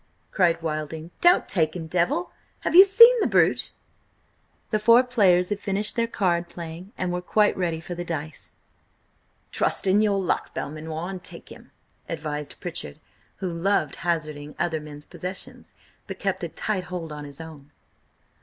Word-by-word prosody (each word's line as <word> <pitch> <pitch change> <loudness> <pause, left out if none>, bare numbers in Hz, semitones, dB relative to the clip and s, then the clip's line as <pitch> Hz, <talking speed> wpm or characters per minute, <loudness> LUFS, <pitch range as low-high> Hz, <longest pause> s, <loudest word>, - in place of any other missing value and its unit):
cried 175 -4 +2
Wilding. 155 +1 -4
"Don't 350 +1 +5
take 160 -3 +1
him, 170 -2 -5
Devil! 180 - 0 0.3
Have - - -2
you 370 +3 +11
seen 465 +5 +8
the - - +2
brute?" - - +2 1.0
The 215 - +2
four 230 +4 +6
players 190 -8 +3
had 205 -1 -2
finished 205 +1 0
their 230 -1 +1
card 175 -6 0
playing 170 +3 -8
and 180 -1 -2
were 180 0 -2
quite 210 +3 +2
ready 170 -3 -1
for 165 +2 -7
the 175 0 -5
dice. 160 -3 -5 1.0
"Trust - - +1
in 195 +2 +4
your 205 -2 +2
luck, 185 - -2
Belmanoir, 155 +3 -5
and 185 -1 -7
take - - -6
him!" - - -13 0.4
advised 150 -3 -5
Pritchard, 70 - -5 0.4
who 185 -3 -4
loved 170 -4 0
hazarding 155 -3 -3
other 160 -2 -1
men's 150 -1 -10
possessions, 185 +1 -8 0.3
but - - -6
kept - - -2
a - - -2
tight 195 -4 -2
hold 180 -3 -6
on 150 0 -7
his 145 0 -8
own. 155 -3 -11
175 Hz, 165 wpm, -25 LUFS, 160-200 Hz, 1.0 s, you